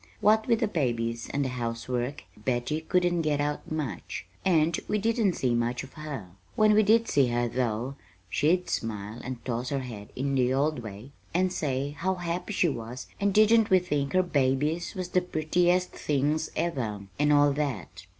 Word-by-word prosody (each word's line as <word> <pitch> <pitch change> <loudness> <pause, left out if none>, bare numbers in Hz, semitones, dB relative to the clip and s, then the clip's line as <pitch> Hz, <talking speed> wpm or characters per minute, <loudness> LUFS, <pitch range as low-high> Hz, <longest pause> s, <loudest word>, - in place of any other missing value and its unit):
What 220 +1 +4
with 230 -1 +2
the 225 - +3
babies 115 - -1
and 140 0 0
the - - -1
housework, 125 +2 -3
Betty 125 +7 -1
couldn't 175 +1 +1
get 150 -2 0
out 145 +1 -2
much, 155 -4 -4 0.2
and 165 -3 +3
we 210 - +1
didn't 220 -2 +2
see 125 -6 0
much 120 +2 0
of 135 - -12
her. 145 - -6 0.3
When 215 -1 +5
we 215 - +6
did 225 +2 +4
see 140 -3 +3
her, 120 0 0
though, 125 +2 -2 0.3
she'd 155 - +2
smile 110 0 -3
and 125 -1 -6
toss 125 0 -2
her 140 -1 -1
head 110 -5 -8
in 140 +2 -1
the 130 -1 +2
old 150 +1 +1
way 110 +3 -9 0.2
and 185 +1 +2
say 140 -1 -1
how 185 +5 -1
happy 175 +2 -3
she 185 -3 +2
was 120 -3 -5
and 200 0 +2
didn't 215 +2 +5
we 190 - +6
think 150 -6 -1
her 185 - +4
babies 150 +3 0
was 185 -2 -4
the 180 0 +2
prettiest 180 +2 +1
things 150 +2 0
ever, 130 -11 -2 0.2
and 150 0 +3
all 145 -1 +5
that. 130 -11 -4
145 Hz, 180 wpm, -28 LUFS, 125-180 Hz, 0.3 s, we